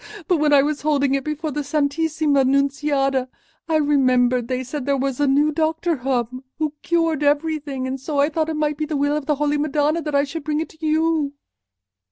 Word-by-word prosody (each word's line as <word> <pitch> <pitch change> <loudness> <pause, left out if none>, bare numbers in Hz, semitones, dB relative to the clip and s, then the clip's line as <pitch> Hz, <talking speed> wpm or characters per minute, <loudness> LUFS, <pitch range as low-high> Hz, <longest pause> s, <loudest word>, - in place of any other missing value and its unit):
But 355 - +3
when 300 -1 +2
I 280 -1 +6
was 300 0 -2
holding 285 -2 +1
it 275 -1 0
before 305 +1 -3
the 295 +1 -3
Santissima 295 0 +1
Nunziata, 275 -1 +1 0.4
I 320 - +2
remembered 255 -5 +2
they 255 0 -2
said 265 +1 -6
there 280 -1 +2
was 270 0 -2
a 290 - +2
new 290 +3 +3
doctor 320 +2 0
come 255 -1 -2
who 310 -2 -1
cured 330 -3 0
everything; 290 -2 0
and 260 +1 -3
so 285 +2 -3
I 285 +2 +3
thought 315 0 -1
it 320 - -2
might 300 -1 -1
be 305 - -2
the 305 -2 -2
will 285 +1 +1
of 300 -2 -4
the 300 - +2
Holy 295 +1 0
Madonna 300 +2 +1
that 300 -2 -3
I 280 - +4
should 305 +2 -6
bring 300 0 -1
it 320 - -3
to 320 0 -18
you." 315 -2 +1
290 Hz, 215 wpm, -21 LUFS, 275-310 Hz, 0.4 s, I